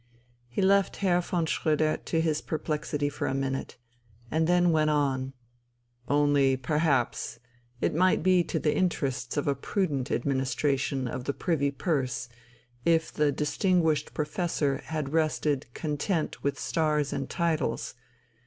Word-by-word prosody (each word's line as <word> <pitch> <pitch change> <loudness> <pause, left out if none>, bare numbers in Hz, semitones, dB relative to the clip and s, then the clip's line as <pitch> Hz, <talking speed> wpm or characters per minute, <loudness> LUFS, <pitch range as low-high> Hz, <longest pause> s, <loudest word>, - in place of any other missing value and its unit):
He 120 +11 -2
left 195 0 +3
Herr 180 -3 +2
von 175 -1 -1
Schröder 155 0 0
to 165 - +1
his 155 -2 0
perplexity 150 -2 -2
for 145 - -3
a 135 - -1
minute, 135 0 -3 0.5
and 160 0 +2
then 175 0 +4
went 155 -1 +3
on: 135 -3 0 0.7
"Only 145 -2 +3
perhaps 140 -1 0 0.4
it - - +1
might 185 +1 +3
be 185 -1 +4
to - - -2
the 150 - +1
interests 135 -8 -1
of 145 - 0
a 140 - +3
prudent 140 -2 -1
administration 135 0 0
of 125 +1 -5
the 140 - -1
Privy 150 -5 0
Purse 135 -4 -2 0.5
if 165 -1 +2
the 150 -1 +2
distinguished 160 +2 +1
professor 150 -2 0
had 155 -2 -3
rested 150 -5 0
content 155 +2 -2
with 140 - 0
stars 150 -3 0
and 135 - -3
titles 165 -4 -1
150 Hz, 135 wpm, -28 LUFS, 140-165 Hz, 0.7 s, then